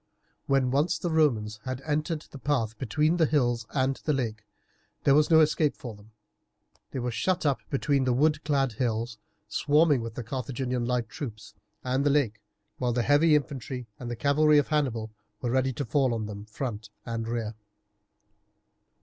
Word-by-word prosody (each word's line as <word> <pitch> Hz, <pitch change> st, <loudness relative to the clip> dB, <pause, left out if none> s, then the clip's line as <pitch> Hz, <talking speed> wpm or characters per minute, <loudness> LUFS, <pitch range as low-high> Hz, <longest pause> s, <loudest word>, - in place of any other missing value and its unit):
When 135 Hz, -2 st, +2 dB
once 145 Hz, +6 st, +2 dB
the 175 Hz, -, -2 dB
Romans 115 Hz, -9 st, +1 dB
had 130 Hz, -1 st, -4 dB
entered 155 Hz, +2 st, -1 dB
the 140 Hz, -, -9 dB
path 120 Hz, -7 st, 0 dB
between 150 Hz, +7 st, +1 dB
the 160 Hz, -3 st, +4 dB
hills 120 Hz, -6 st, +1 dB
and 135 Hz, -1 st, 0 dB
the 150 Hz, -, +1 dB
lake 110 Hz, -5 st, -3 dB, 0.6 s
there 140 Hz, -, +5 dB
was 150 Hz, +1 st, +4 dB
no 160 Hz, -1 st, +7 dB
escape 155 Hz, -1 st, +2 dB
for 120 Hz, -3 st, -7 dB
them. 105 Hz, +1 st, -17 dB, 0.8 s
They -, -, -6 dB
were 125 Hz, -1 st, -2 dB
shut 175 Hz, +10 st, 0 dB
up 140 Hz, -2 st, +2 dB
between 140 Hz, -1 st, +1 dB
the 130 Hz, -, +2 dB
wood 150 Hz, +4 st, +2 dB
clad 140 Hz, -3 st, +1 dB
hills 115 Hz, 0 st, -2 dB, 0.3 s
swarming 150 Hz, -2 st, +3 dB
with 115 Hz, -1 st, -6 dB
the 120 Hz, -, -4 dB
Carthaginian 125 Hz, 0 st, -3 dB
light 125 Hz, -2 st, 0 dB
troops 110 Hz, -5 st, -8 dB, 0.3 s
and 130 Hz, +2 st, 0 dB
the 145 Hz, -, +3 dB
lake, 130 Hz, -7 st, +1 dB, 0.4 s
while 125 Hz, -1 st, 0 dB
the 120 Hz, 0 st, +1 dB
heavy 150 Hz, +3 st, +5 dB
infantry 135 Hz, -3 st, -3 dB
and 120 Hz, -1 st, -5 dB
cavalry 150 Hz, +4 st, +4 dB
of 145 Hz, -, +2 dB
Hannibal 125 Hz, -8 st, 0 dB, 0.3 s
were 120 Hz, -, -2 dB
ready 130 Hz, +1 st, +2 dB
to 140 Hz, +3 st, -3 dB
fall 130 Hz, 0 st, +2 dB
on 110 Hz, -1 st, -3 dB
them 105 Hz, 0 st, -7 dB
front 110 Hz, -1 st, -5 dB, 0.2 s
and 115 Hz, -1 st, -3 dB
rear. 115 Hz, -2 st, -2 dB
130 Hz, 175 wpm, -27 LUFS, 115-145 Hz, 0.8 s, no